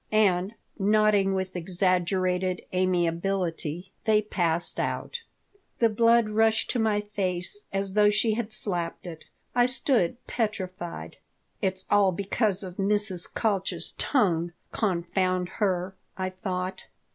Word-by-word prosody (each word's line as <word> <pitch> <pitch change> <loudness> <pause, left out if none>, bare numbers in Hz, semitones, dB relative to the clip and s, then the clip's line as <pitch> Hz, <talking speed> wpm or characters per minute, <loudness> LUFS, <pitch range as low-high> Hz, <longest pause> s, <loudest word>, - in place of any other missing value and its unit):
And, 200 -1 +2 0.2
nodding 205 -1 +3
with 190 0 -3
exaggerated 185 +1 0
amiability, 180 -1 -1
they 215 -1 +4
passed 175 -5 0
out 480 - -3 0.6
The 230 - +4
blood 230 0 +4
rushed 220 +1 +2
to 250 - -1
my 215 -2 +2
face 200 - -3
as 195 0 -2
though 210 0 +5
she 215 +2 +2
had 225 0 -3
slapped 175 -6 -1
it. 165 -3 -8 0.3
I 245 0 +4
stood 250 - +1
petrified. 185 -6 -4 0.4
"It's 190 -2 -2
all 200 -2 +5
because 200 +1 0
of 185 -1 -8
Mrs. 200 -3 +1
Kalch's 200 -4 +1
tongue, 175 - +1 0.2
confound 185 -2 0
her!" 190 -2 0 0.2
I 185 0 -2
thought. 185 -1 -4
195 Hz, 120 wpm, -27 LUFS, 180-215 Hz, 0.6 s, though